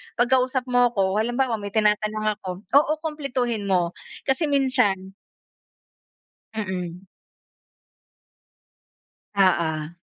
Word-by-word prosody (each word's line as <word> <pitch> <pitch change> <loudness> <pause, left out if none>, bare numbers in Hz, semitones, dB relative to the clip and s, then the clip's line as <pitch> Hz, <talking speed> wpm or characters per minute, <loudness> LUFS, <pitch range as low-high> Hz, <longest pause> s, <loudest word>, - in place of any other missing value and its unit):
'pag 240 +2 +1
kausap 255 0 +2
mo 245 -2 +2
ako, 195 +1 +1
halimbawa, 240 0 0
may 200 -1 -6
tinatanong 215 0 +1 0.2
ako 185 +2 -6
oo, 290 +2 +5
kumpletuhin 250 -9 -2
mo." 180 -3 +2 0.3
Kasi 270 +4 0
minsan 250 -9 +1 1.4
Mm. 185 -3 -4 2.3
Oo. 165 -4 +2
215 Hz, 90 wpm, -24 LUFS, 190-255 Hz, 2.3 s, oo